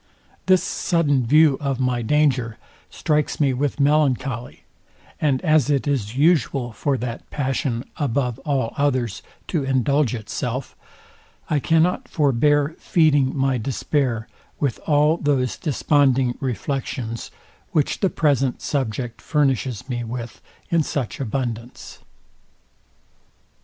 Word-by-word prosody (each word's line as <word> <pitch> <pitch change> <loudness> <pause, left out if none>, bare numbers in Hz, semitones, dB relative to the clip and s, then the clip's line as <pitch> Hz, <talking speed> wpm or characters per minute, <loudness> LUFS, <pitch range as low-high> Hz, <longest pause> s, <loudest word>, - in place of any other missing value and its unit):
This 185 -1 +5
sudden 145 -8 +1
view 150 0 +5
of 135 -2 -1
my 125 -2 0
danger 125 -3 +1 0.3
strikes 150 -1 -1
me 140 -3 +3
with 140 +3 -2
melancholy; 135 -4 +1 0.6
and 140 -4 +2
as 155 -3 +3
it 140 -1 +1
is 125 -5 -1
usual 140 -6 +2
for 140 +3 -1
that 120 -1 -6
passion, 130 -3 -2
above 125 -4 -1
all 135 -6 -1
others, 130 -7 0 0.3
to 160 -6 0
indulge 135 0 +1
itself; 125 +3 -4 0.8
I 150 - +3
cannot 165 +5 +2
forbear 145 +1 +2
feeding 145 -5 +2
my 135 -2 +1
despair, 125 -1 -1 0.3
with 140 -6 -1
all 150 +1 +4
those 140 -5 0
desponding 135 -4 +2
reflections, 125 -1 -3 0.4
which 150 -3 0
the 195 - +2
present 135 -6 +1
subject 120 -3 -2
furnishes 135 -5 0
me 120 -2 -3
with 120 0 -6 0.3
in 170 -1 +4
such 140 -5 -3
abundance. 120 -2 -4
135 Hz, 115 wpm, -22 LUFS, 125-145 Hz, 0.8 s, This